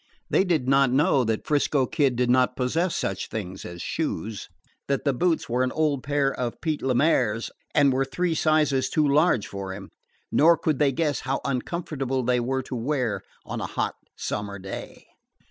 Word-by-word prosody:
They - - +4
did 165 -9 0
not 135 0 +4
know 135 -1 +3
that 110 -1 -1
'Frisco 145 -2 +2
Kid 135 -2 +1
did 125 +1 +1
not 125 0 +3
possess 160 +8 0
such 95 - -2
things 95 -3 -5
as 85 0 -7
shoes 105 +4 -3 0.4
that 140 +1 -1
the 140 - +3
boots 165 +5 +1
were 120 +2 0
an 130 0 +1
old 150 -4 0
pair 140 -1 +1
of 120 -2 -4
Pete 155 -3 -2
Le 130 -1 0
Maire's 120 -6 +2 0.2
and 140 -2 +5
were 135 +1 +2
three 165 +6 -1
sizes 155 -4 +2
too 155 -2 +2
large 145 - +3
for 100 -1 -6
him. 95 -1 -10 0.4
Nor 165 +2 +5
could 155 -4 0
they 145 -2 +4
guess 145 -1 0
how 135 0 -2
uncomfortable 135 -1 -2
they 125 0 +2
were 130 +2 -1
to 130 - -6
wear 120 -5 -1 0.2
on - - -4
a - - -2
hot - - -2 0.2
summer 100 -1 -4
day. 95 0 -8
135 Hz, 185 wpm, -25 LUFS, 120-150 Hz, 0.4 s, and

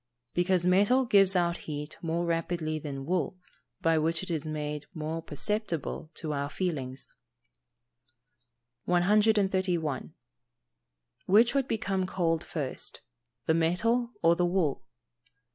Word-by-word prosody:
_ - - -51
Because 180 0 +2
metal 205 +8 +4
gives 195 -4 +5
out 175 -1 +2
heat 150 0 -5
more 170 +1 -1
rapidly 165 -2 -1
than 140 -3 -6
wool, 180 +2 -1 0.5
by 165 -1 +4
which 165 +3 0
it 185 - -4
is 155 -3 -1
made 150 -1 -4
more 160 +1 -3
perceptible 165 -2 -3
to 155 -2 -3
our 140 0 -2
feelings. 140 -7 -3 1.7
131. 185 - +2 1.1
_Which 225 +5 +6
would 275 -2 +1
become 195 -4 -1
cold 165 -3 0
first 145 -6 -4 0.4
the 160 - +3
metal 230 +9 +1
or 165 +1 +6
the 180 - +1
wool? 175 -6 0
170 Hz, 120 wpm, -29 LUFS, 155-190 Hz, 1.7 s, Which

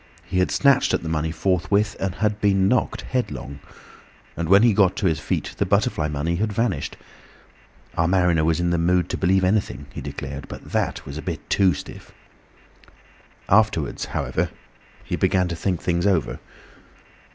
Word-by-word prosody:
He 90 - -2
had 90 - +2
snatched 140 -2 +3
at - - -4
the 80 - -4
money 80 0 -1
forthwith 95 +5 +1
and 95 -2 -2
had 105 -1 -1
been 95 -2 +3
knocked 125 +4 +1
headlong, 70 - -4 0.8
and 85 0 -3
when 100 +3 +7
he 120 - +6
had 105 - 0
got 95 -3 +4
to 105 - -2
his 80 -4 +2
feet - - -3
the - - +3
butterfly 75 - +1
money 75 +3 -2
had 105 +3 -1
vanished. 115 -1 -1 1.0
Our 85 - +2
mariner 90 -3 +3
was 80 +1 +1
in 85 0 +1
the 85 - +1
mood 90 +1 +2
to - - -2
believe 95 +1 +2
anything, 95 -6 0
he - - -6
declared, 70 0 -6
but - - -10
that - - -1
was 70 +3 -6
a - - -5
bit 85 -5 -5
too 95 -5 +4
stiff. - - -10 1.4
Afterwards, - - +2
however, - - -2 0.5
he - - -3
began 90 -1 +2
to 85 - -3
think 90 0 -2
things 85 +1 +1
over. 90 -6 0
90 Hz, 175 wpm, -23 LUFS, 80-100 Hz, 1.4 s, when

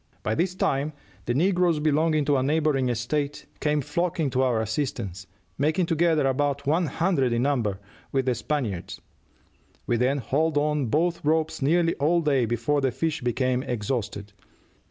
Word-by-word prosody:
By 110 - 0
this 180 +8 0
time 145 -3 0 0.3
the 120 - -1
negroes 175 +1 +2
belonging 155 0 +2
to 145 0 +2
a - - +1
neighboring 145 -2 +1
estate 140 +5 -2
came 150 -1 +1
flocking 165 -1 -1
to 130 - +1
our 125 -4 +2
assistance, 105 -5 -3 0.3
making 160 +6 +2
together 165 -2 +2
about 140 +1 0
one 160 +4 +2
hundred 160 -7 +1
in 120 +1 +1
number, 120 -9 0 0.3
with 135 -1 0
the 130 - +2
Spaniards. 120 - -3 0.9
We 120 - +1
then 130 +4 +2
hauled 150 +4 0
on 150 -2 +1
both 170 +8 0
ropes 160 +1 0
nearly 165 +4 +3
all 165 +4 +2
day 140 -6 +2
before 120 +6 0
the 135 - +2
fish 160 +4 -2
became 125 +1 0
exhausted. 105 -4 -3
145 Hz, 155 wpm, -25 LUFS, 125-155 Hz, 0.9 s, nearly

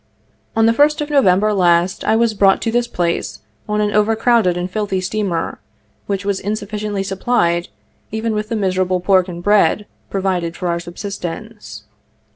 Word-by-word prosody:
On 225 0 +4
the 225 - +5
1st 295 +4 +3
of 295 - -3
November 210 -6 +3
last 175 -1 +2
I 220 - +2
was 230 0 +2
brought 195 -2 +4
to 225 - 0
this 240 +1 +1
place 170 -5 -2 0.3
on 210 0 +1
an 210 0 +1
over 210 +1 +3
crowded 225 -6 +2
and 175 0 -2
filthy 195 0 -2
steamer, 190 -3 -2 0.5
which 200 -1 -2
was 200 -1 0
insufficiently 210 0 -3
supplied 185 -3 0 0.4
even 220 +1 -2
with 210 0 -3
the 230 - -1
miserable 185 -2 0
pork 185 0 +3
and 175 -1 -7
bread 210 +1 +3 0.2
pro 195 -1 -3
vided 175 -3 -1
for 180 - -3
our 170 0 0
subsistence. 180 - -7
200 Hz, 170 wpm, -18 LUFS, 180-215 Hz, 0.5 s, the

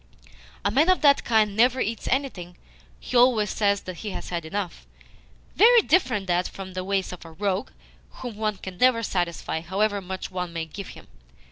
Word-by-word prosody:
A 200 - +2
man 300 - +3
of 370 - +4
that 285 -2 +5
kind 215 -3 +2
never 245 +4 +3
eats 225 -1 -2
anything 200 -11 -2 0.4
he - - -7
always 240 -4 +4
says 200 -2 +1
that 185 -2 -8
he 215 - -5
has - - -6
had 170 -2 -3
enough. 185 +1 -5 0.7
Very 470 +1 +7
different 250 - +2
that 180 0 +1
from 190 -1 -9
the 185 0 -4
ways 190 -1 -1
of 180 - -10
a 165 - -12
rogue, 190 +3 -2 0.4
whom 245 -4 -8
one 215 -1 -2
can 185 -1 -9
never 250 -2 +4
satisfy, 175 -4 -2
however 200 +4 0
much 190 0 -6
one 180 -2 -4
may 165 -1 -3
give 190 +5 -8
him. - - -13
200 Hz, 190 wpm, -25 LUFS, 180-235 Hz, 0.7 s, Very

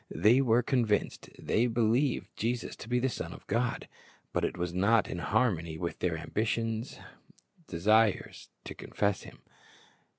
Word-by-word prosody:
^ - - -33
They 120 +5 +4
were 120 -2 +3
convinced; 115 -6 0
they 120 +3 +1
believed 120 +3 +1
Jesus 120 +1 -2
to 110 - -10
be 125 - +2
the 125 +2 +1
Son 130 - -5
of - - -13
God; 120 +3 -1 0.5
but - - 0
it - - -1
was 90 -1 -2
not 100 +4 +3
in 90 - -5
harmony 85 -5 0
with 85 0 -4
their 85 -3 0
ambitious 115 - -2 0.7
desires 105 +4 +1
to - - -7
confess 100 -2 -1
Him. - - -14
110 Hz, 155 wpm, -30 LUFS, 95-120 Hz, 0.7 s, They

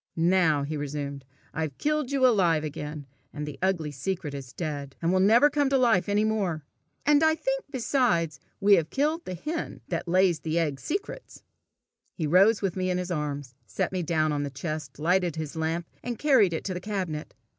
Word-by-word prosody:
"Now," 165 -3 +3
he 150 +2 -3
resumed, 140 -1 -5 0.3
"I've 155 -4 -3
killed 300 -3 0
you 275 -2 +2
alive 175 -10 +3
again, 150 -1 -5 0.3
and 150 0 -5
the 150 -2 -8
ugly 175 -5 0
secret 150 +2 -4
is 135 -3 -7
dead, 145 -3 -5
and 170 +2 +1
will 185 - +3
never 225 +9 +6
come 290 -2 +1
to 275 - +3
life 230 -7 +3
any 205 +1 +2
more. 190 -9 -1 0.4
And 295 0 +5
I 315 0 +4
think, - - -2
besides, 230 - +1 0.2
we 200 +1 +5
have 160 -2 -1
killed 305 +4 0
the 185 - -4
hen 310 - -5
that - - -3
lays 180 -1 +3
the 160 +1 -2
egg 150 -5 0
secrets!" 395 - -5 0.7
He 165 - -2
rose 195 +8 +4
with 190 -3 0
me 185 -1 -1
in 180 - 0
his 180 0 -3
arms, 145 -5 -3
set 95 - -2
me 185 -1 -1
down 155 -2 +1
on 145 -1 -1
the 145 - -2
chest, 150 0 -5
lighted 175 +2 +1
his 160 0 -5
lamp, 160 +1 -1 0.2
and 240 -2 -4
carried 260 - +4
it 160 - -3
to 190 - -3
the 180 - -5
cabinet. 185 -7 -4
175 Hz, 200 wpm, -27 LUFS, 150-215 Hz, 0.7 s, never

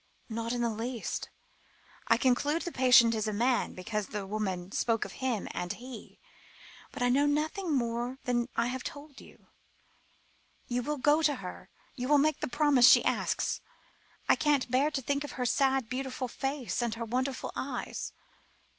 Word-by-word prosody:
"Not 230 +1 -3
in 240 0 -1
the 235 - +1
least. 230 +2 -4 0.8
I - - +5
conclude 285 +5 +1
the 345 - -4
patient 245 -4 +6
is 220 -1 -1
a - - 0
man, 240 +4 +1
because 210 +2 -3
the 205 -1 -4
lady 190 -3 -3
spoke 225 -2 +1
of - - -8
'him' 255 -6 -2
and 175 0 -3
'he,' 245 -2 -10 0.7
but 245 - -3
I 245 - +3
know 280 +4 +3
nothing 315 +5 -1
more 240 +1 -1
than 240 0 0
I 230 - +2
have 255 +1 -3
told 285 -1 -9
you. - - -17 1.2
You 245 0 -1
will 295 +4 -2
go 295 +4 +3
to 295 -2 +3
her? 185 -7 -8 0.3
You 250 -1 -3
will 295 +1 +5
make 305 +2 +2
the - - -2
promise 275 -2 +5
she - - +6
asks? - - 0 0.7
I - - +6
can't 285 -5 +1
bear 270 +4 +3
to 275 -3 -3
think 285 +3 -1
of 290 - -7
her 250 - -2
sad, 270 -1 +2
beautiful 255 +1 -3
face, 270 -4 -3
and 235 -2 -1
her 230 0 -4
wonderful 255 +3 -2
eyes." 260 -2 -4
250 Hz, 175 wpm, -30 LUFS, 230-280 Hz, 1.2 s, patient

